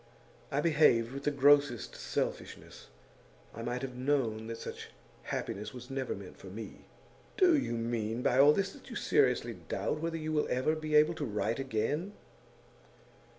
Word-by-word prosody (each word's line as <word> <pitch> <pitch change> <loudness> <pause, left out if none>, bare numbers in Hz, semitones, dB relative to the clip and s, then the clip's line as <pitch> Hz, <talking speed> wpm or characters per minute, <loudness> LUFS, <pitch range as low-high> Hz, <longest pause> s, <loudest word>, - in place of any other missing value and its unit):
I 140 - 0
behaved 150 -8 +4
with 140 +1 -7
the - - +4
grossest 140 -5 +3
selfishness. - - -4 0.7
I 115 - -7
might 120 +2 -3
have 130 -1 -4
known 125 -4 0
that 115 0 -5
such - - -7 0.4
happiness 105 +6 -4
was 125 +1 -9
never 135 -1 -2
meant 95 -2 -11
for - - -11
me.' 105 +4 -9 0.5
'Do 365 -4 +6
you 275 - 0
mean 115 0 -2
by 125 - +3
all 145 +2 +8
this 195 +5 0
that - - -14
you - - -7
seriously 430 - +2
doubt 155 - -3
whether 165 +1 -2
you 155 0 -3
will 150 - +1
ever 130 +5 +1
be 155 -1 -2
able 155 +2 +6
to 155 -3 -4
write 110 +1 -1
again? 135 - -2
135 Hz, 165 wpm, -31 LUFS, 115-150 Hz, 0.7 s, all